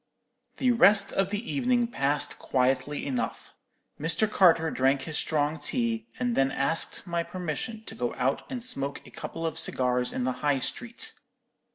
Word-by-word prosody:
"The 255 Hz, -1 st, +3 dB
rest 205 Hz, -4 st, +5 dB
of 195 Hz, -1 st, +1 dB
the 210 Hz, +3 st, -3 dB
evening 250 Hz, -3 st, +2 dB
passed 145 Hz, -8 st, 0 dB
quietly 130 Hz, +2 st, 0 dB
enough. 130 Hz, -3 st, -3 dB, 0.5 s
Mr. 165 Hz, +8 st, +2 dB
Carter 165 Hz, -6 st, +4 dB
drank 135 Hz, +1 st, +2 dB
his 155 Hz, +2 st, -5 dB
strong 150 Hz, 0 st, 0 dB
tea, 230 Hz, -, -1 dB
and 245 Hz, -2 st, 0 dB
then 135 Hz, 0 st, +3 dB
asked 140 Hz, +7 st, 0 dB
my 170 Hz, -2 st, -1 dB
permission 180 Hz, +5 st, -4 dB
to -, -, -7 dB
go 120 Hz, +1 st, -3 dB
out 135 Hz, +2 st, 0 dB
and 250 Hz, -3 st, -4 dB
smoke 140 Hz, -, -1 dB
a -, -, -14 dB
couple 165 Hz, -, -6 dB
of 160 Hz, 0 st, -1 dB
cigars 125 Hz, -5 st, 0 dB
in 125 Hz, -, -2 dB
the 130 Hz, -, +1 dB
High 145 Hz, -2 st, +2 dB
Street. 240 Hz, -, -4 dB
165 Hz, 165 wpm, -28 LUFS, 135-225 Hz, 0.5 s, rest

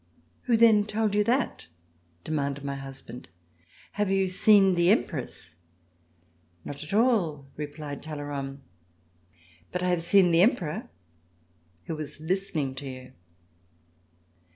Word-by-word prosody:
" 85 Hz, 0 st, -38 dB
Who 235 Hz, -2 st, +3 dB
then 220 Hz, -3 st, +6 dB
told 215 Hz, 0 st, -1 dB
you 210 Hz, 0 st, +3 dB
that? 250 Hz, +5 st, 0 dB, 0.3 s
" 85 Hz, 0 st, -38 dB
demanded 140 Hz, -2 st, -2 dB
my 140 Hz, 0 st, -3 dB
husband. 135 Hz, -3 st, -9 dB, 0.6 s
"Have 205 Hz, -1 st, -1 dB
you 195 Hz, 0 st, +2 dB
seen 195 Hz, +1 st, +5 dB
the 175 Hz, 0 st, +3 dB
Empress.''" 125 Hz, -, -1 dB, 1.1 s
"Not 145 Hz, +1 st, -6 dB
at 150 Hz, -, -9 dB
all," 200 Hz, -, +2 dB
replied 145 Hz, -1 st, -6 dB
Talleyrand, 145 Hz, -2 st, -6 dB, 1.1 s
"but 180 Hz, 0 st, -2 dB
I 180 Hz, -, +1 dB
have 175 Hz, -2 st, +1 dB
seen 175 Hz, +1 st, +4 dB
the 165 Hz, +1 st, +5 dB
Emperor 215 Hz, -, +1 dB, 0.9 s
who 165 Hz, -, -4 dB
was 155 Hz, -1 st, -7 dB
listening 160 Hz, -5 st, -1 dB
to 140 Hz, 0 st, -5 dB
you!" 130 Hz, 0 st, -10 dB
160 Hz, 130 wpm, -27 LUFS, 140-200 Hz, 1.1 s, then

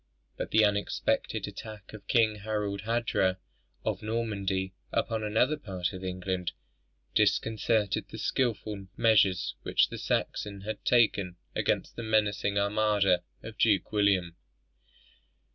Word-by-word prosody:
But -, -, -4 dB
the 110 Hz, -1 st, +5 dB
unexpected 105 Hz, -1 st, 0 dB
attack 105 Hz, -3 st, -9 dB
of 110 Hz, -, -11 dB
King 110 Hz, -3 st, +3 dB
Harald 105 Hz, -1 st, -2 dB
Hardrada 115 Hz, -5 st, +1 dB, 0.5 s
of -, -, -1 dB
Norway 100 Hz, -4 st, -2 dB, 0.2 s
upon 110 Hz, -1 st, 0 dB
another 110 Hz, +8 st, +2 dB
part 95 Hz, -9 st, -3 dB
of 95 Hz, 0 st, -7 dB
England, 90 Hz, -1 st, -3 dB, 0.6 s
disconcerted 105 Hz, 0 st, +1 dB
the -, -, -8 dB
skilful 105 Hz, -5 st, -1 dB
measures 100 Hz, -6 st, +3 dB
which -, -, +2 dB
the -, -, -6 dB
Saxon 100 Hz, -1 st, -2 dB
had 110 Hz, +1 st, -5 dB
taken 100 Hz, -7 st, +3 dB, 0.2 s
against -, -, 0 dB
the -, -, -3 dB
menacing 105 Hz, -2 st, +1 dB
armada 100 Hz, -3 st, +3 dB, 0.2 s
of 110 Hz, -1 st, -9 dB
Duke 105 Hz, -5 st, +3 dB
William. 100 Hz, -5 st, +2 dB
105 Hz, 120 wpm, -29 LUFS, 95-110 Hz, 0.6 s, the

